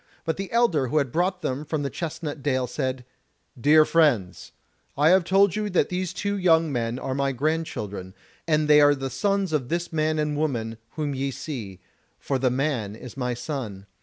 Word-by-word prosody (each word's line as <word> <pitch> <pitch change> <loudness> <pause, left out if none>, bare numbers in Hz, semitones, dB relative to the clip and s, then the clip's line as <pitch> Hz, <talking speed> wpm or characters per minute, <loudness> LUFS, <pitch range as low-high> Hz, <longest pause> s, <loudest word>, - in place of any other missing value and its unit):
But 160 - -1
the 195 0 -5
elder 205 - +2
who 150 - 0
had 140 -4 +1
brought 180 +3 0
them 130 +3 -2
from 150 -2 -2
Chestnut 155 -1 -5
dale 130 -2 0
said: 130 -1 -3 0.5
"Dear 150 +5 +5
friends, 140 - +1 0.5
I 150 +3 +5
have 185 +1 +5
told 195 +1 +3
you 210 -1 -1
that 180 - +2
these 180 -1 -2
two 200 0 -2
young 165 -3 +3
men 120 -2 -1
are 130 - -3
my 140 0 0
grand 155 +5 0
children, 100 -2 -6 0.3
and 155 -1 +2
they 150 0 +7
are 145 0 +6
the 135 -1 -4
sons 195 +5 0
of 130 -5 -1
this 170 0 -2
man 155 0 +1
and 150 -1 0
woman 115 -7 -2
whom 150 -2 -2
ye 135 +1 -2
see; 115 - -6 0.4
for 135 -2 -2
the 130 0 +2
man 125 -6 -1
is 125 +2 -10
my 125 -2 -2
son. 120 -6 -5
145 Hz, 190 wpm, -25 LUFS, 130-165 Hz, 0.5 s, they